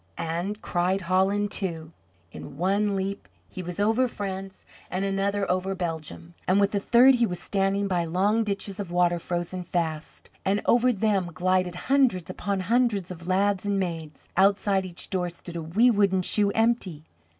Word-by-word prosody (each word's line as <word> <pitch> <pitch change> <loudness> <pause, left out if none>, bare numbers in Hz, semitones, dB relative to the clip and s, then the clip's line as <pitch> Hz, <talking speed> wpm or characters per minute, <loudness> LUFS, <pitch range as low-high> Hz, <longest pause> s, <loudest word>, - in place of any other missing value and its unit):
and 175 +6 -3
cried 180 +2 0
"Holland!" 190 +3 +1
too. 165 -5 -2 0.4
In 140 +7 -10
one 200 +4 +1
leap 195 +1 -3 0.2
he 185 - -7
was 180 +1 -6
over 225 +5 +3
France, 195 -3 -6 0.2
and 190 +2 -2
another 195 +1 0
over 185 +1 -1
Belgium; 155 - -5
and 185 +2 +4
with 200 0 +3
the 200 - 0
third 245 +6 +6
he 240 -2 +2
was 180 -2 -5
standing 195 +1 0
by 175 -3 0
long 200 +7 +1
ditches 200 -1 -4
of 200 -4 -4
water 175 0 +2
frozen 175 +1 -3
fast, 160 -3 -4
and 200 +2 +1
over 245 +1 +4
them 200 -4 0
glided 185 -1 +1
hundreds 260 -10 +2
upon 200 -2 -2
hundreds 210 -3 +1
of 170 -1 -9
lads 195 +1 +1
and 200 -1 0
maids. 165 -5 -5
Outside 195 0 +3
each 175 -1 -9
door 180 -2 0
stood 175 0 -10
a 170 - -3
wee 205 +10 +3
wooden 195 -3 +2
shoe 205 +2 +2
empty. 225 -9 0
190 Hz, 170 wpm, -26 LUFS, 175-205 Hz, 0.4 s, third